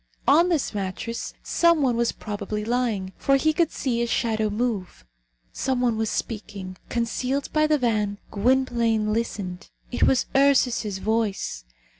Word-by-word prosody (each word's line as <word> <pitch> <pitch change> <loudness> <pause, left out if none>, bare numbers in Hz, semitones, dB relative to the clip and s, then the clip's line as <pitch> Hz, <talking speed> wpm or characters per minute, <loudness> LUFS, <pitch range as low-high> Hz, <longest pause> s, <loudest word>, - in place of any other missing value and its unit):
On 340 +4 +5
this 320 -9 0
mattress 205 +3 -4
some 335 -3 +3
one 250 -3 +2
was 235 0 +1
probably 210 0 -5
lying, 225 -6 -1
for 275 - +3
he 310 +3 +2
could 330 0 +2
see 240 -4 -1
a 235 - 0
shadow 220 -2 0
move. 205 - -3 0.5
Some 260 -1 -1
one 245 -2 +2
was 220 -1 -1
speaking. 200 -4 -5
Concealed 250 +4 -1
by 305 0 +3
the 305 0 +3
van, 215 -5 0
Gwynplaine 230 -2 +2
listened. 200 -5 -3 0.2
It - - -4
was 260 - +4
Ursus's 250 -7 +3
voice. 205 - -1
230 Hz, 145 wpm, -24 LUFS, 210-260 Hz, 0.5 s, On